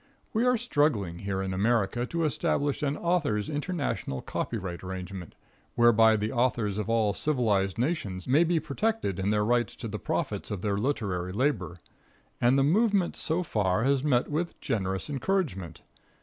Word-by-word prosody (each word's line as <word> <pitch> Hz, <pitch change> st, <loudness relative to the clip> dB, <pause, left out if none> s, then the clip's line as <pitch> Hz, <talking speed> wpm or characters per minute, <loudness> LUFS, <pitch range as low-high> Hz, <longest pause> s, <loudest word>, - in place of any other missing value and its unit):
We 235 Hz, +3 st, +2 dB
are 250 Hz, -1 st, +4 dB
struggling 145 Hz, -, 0 dB
here 95 Hz, 0 st, -2 dB
in 95 Hz, -1 st, -3 dB
America 115 Hz, +3 st, +1 dB
to 170 Hz, +3 st, -1 dB
establish 145 Hz, -1 st, 0 dB
an 145 Hz, -1 st, 0 dB
authors' 155 Hz, -, 0 dB
international 145 Hz, -, -3 dB
copyright 90 Hz, -2 st, -4 dB
arrangement, 95 Hz, -1 st, -7 dB, 0.4 s
whereby 115 Hz, -1 st, +6 dB
the 105 Hz, +1 st, -2 dB
authors 115 Hz, -5 st, 0 dB
of 105 Hz, -, -3 dB
all 110 Hz, -3 st, +2 dB
civilized 105 Hz, -9 st, +1 dB
nations 115 Hz, -, -2 dB
may 140 Hz, +6 st, +5 dB
be 170 Hz, -1 st, +2 dB
protected 155 Hz, -, -1 dB
in 95 Hz, +1 st, 0 dB
their 105 Hz, 0 st, +2 dB
rights 120 Hz, -1 st, +1 dB
to 115 Hz, -, -6 dB
the 105 Hz, 0 st, -5 dB
profits -, -, -2 dB
of 100 Hz, -3 st, -4 dB
their 100 Hz, -2 st, 0 dB
literary 100 Hz, -7 st, -1 dB
labor, 115 Hz, -, 0 dB, 0.6 s
and 125 Hz, +3 st, +4 dB
the 135 Hz, -, +4 dB
movement 200 Hz, +4 st, +2 dB
so 165 Hz, +3 st, 0 dB
far 105 Hz, -, 0 dB
has 135 Hz, 0 st, +2 dB
met 125 Hz, -5 st, +2 dB
with 165 Hz, +3 st, -3 dB
generous 95 Hz, -8 st, -2 dB
encouragement. 135 Hz, -, -2 dB
120 Hz, 160 wpm, -28 LUFS, 100-150 Hz, 0.6 s, whereby